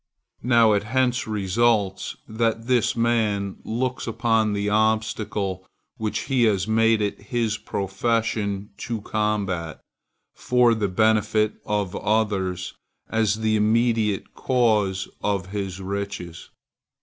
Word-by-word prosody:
Now, 115 -3 +4
it 100 - +2
hence 125 +2 0
results, 105 -1 +1
that 115 0 -1
this 125 -2 +2
man 110 -4 0
looks 125 +3 -2
upon 115 -2 +1
the 100 0 -1
obstacle 105 -3 0 0.3
which 110 -1 -2
he 130 -4 +2
has 100 -3 +1
made 115 0 +3
it 100 - -3
his 110 0 -1
profession 100 0 -1
to 115 -3 -4
combat 100 -7 -2 0.5
for 125 -1 +3
the 110 -2 0
benefit 110 +1 +2
of 105 -3 -1
others, 95 -4 -1 0.4
as 110 -1 +1
the 110 0 +2
immediate 110 -1 +1
cause 105 -7 +1
of 100 -3 -1
his 95 -2 -4
riches. 100 -3 -5
110 Hz, 115 wpm, -24 LUFS, 100-115 Hz, 0.5 s, Now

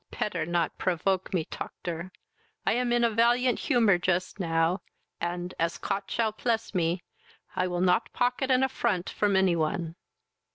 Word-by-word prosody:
"Petter 180 -6 -2
not 175 -1 -1
provoke 185 +1 0
me, 170 -4 0
toctor. 170 +2 -6 0.6
I - - +3
am 245 0 0
in 240 0 +3
a 235 - +5
valiant 240 +3 +3
humour 215 -7 +3
just 180 +2 -1
now, 165 +1 +1 0.4
and, 175 +1 -3
as 165 0 0
Cot 195 0 -3
shall 225 -2 0
pless 225 0 -1
me, 175 -1 0 0.5
I 185 - +1
will 175 -1 -2
not 185 +5 +2
pocket 250 +2 0
an 255 0 +4
affront 205 -8 0
from 205 -2 +1
any 190 -2 +4
one." 165 +1 -1
185 Hz, 160 wpm, -28 LUFS, 175-230 Hz, 0.6 s, a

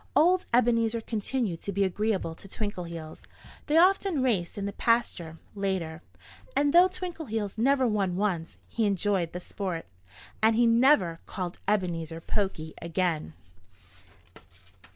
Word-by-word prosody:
Old 360 +4 +4
Ebenezer 230 -1 +3
continued 220 -4 -2
to 200 - -4
be 200 +1 +1
agreeable 195 -2 -1
to 180 - -12
Twinkleheels. 175 -7 -5 0.5
They 305 +1 +3
often 365 -4 +4
raced 205 -10 0
in 200 - -3
the 200 - -3
pasture, 205 -9 0 0.2
later. 185 -5 -2 0.5
And 285 0 +2
though 350 +2 +8
Twinkleheels 320 - -4
never 265 +2 +3
won 200 -6 0
once, 180 -4 -2
he 225 -2 0
enjoyed 195 -3 +1
the 180 - -5
sport. 180 -2 -5 0.6
And 220 +1 +4
he 240 +1 +4
never 230 - +4
called 180 -3 -5
Ebenezer 170 -5 -1
"poky" 165 -4 -2
again. 165 - -1
205 Hz, 130 wpm, -28 LUFS, 175-235 Hz, 0.6 s, though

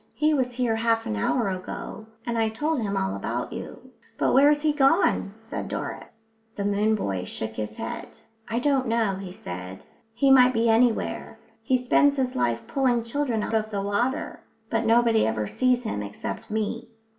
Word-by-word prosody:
He 305 +1 +2
was 255 -3 0
here 240 -2 0
half 225 0 +1
an 105 - -2
hour 210 - +1
ago, 185 +3 -6 0.2
and 235 - -2
I 225 -1 +2
told 295 +5 -1
him 200 -2 -1
all 190 0 -1
about - - -3
you." - - -9 0.3
"But - - +2
where's 290 +2 +5
he 305 -1 +3
gone?" 270 - +2
said 225 0 -6
Doris. 225 0 -7 0.2
The 200 - -3
moon 210 +2 +2
boy 95 - -2
shook 110 +3 -5
his 105 -1 -5
head. 235 - -6 0.3
"I 230 - -1
don't 265 0 +1
know," 225 -4 +1
he 190 -2 -7
said. 90 - -8 0.3
"He 275 +2 +4
might 255 -1 +7
be 230 +1 +2
anywhere. 230 0 +1 0.2
He 260 - +2
spends 280 +3 +3
his 255 -1 -1
life 120 -1 0
pulling 250 -4 +1
children 235 -2 -1
out - - -4
of 215 -1 +1
the 200 -2 -2
water. 240 +9 -1 0.3
But 225 0 +1
nobody 230 - +4
ever 110 -1 -1
sees 250 - +1
him 215 - -3
except 100 -1 -6
me." 220 +2 -2
225 Hz, 180 wpm, -25 LUFS, 200-255 Hz, 0.3 s, might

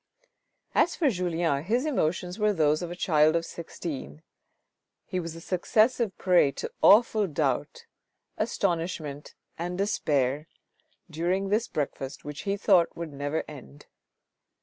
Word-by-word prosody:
As 345 - +3
for 300 -6 +2
Julien, 170 -6 0
his 240 - +1
emotions 180 - -1
were 210 0 +3
those 155 -3 +2
of 175 - -4
a 175 - -6
child 155 -3 +3
of 165 0 0
sixteen. 160 -2 -7 0.8
He 185 -4 -3
was 165 -2 -5
a - - -8
successive 215 +4 +1
prey 180 -6 +4
to - - -5
awful 215 -1 +5
doubt, 145 -5 -2 0.5
astonishment 165 -4 -2 0.2
and 175 +1 -3
despair 150 -7 0 0.6
during 180 +4 -1
this 215 +3 +1
breakfast 135 -2 -4
which 150 0 -6
he 200 - 0
thought 190 -4 +3
would 165 -3 -6
never 145 +3 -2
end. 145 0 -12
170 Hz, 130 wpm, -27 LUFS, 150-195 Hz, 0.8 s, awful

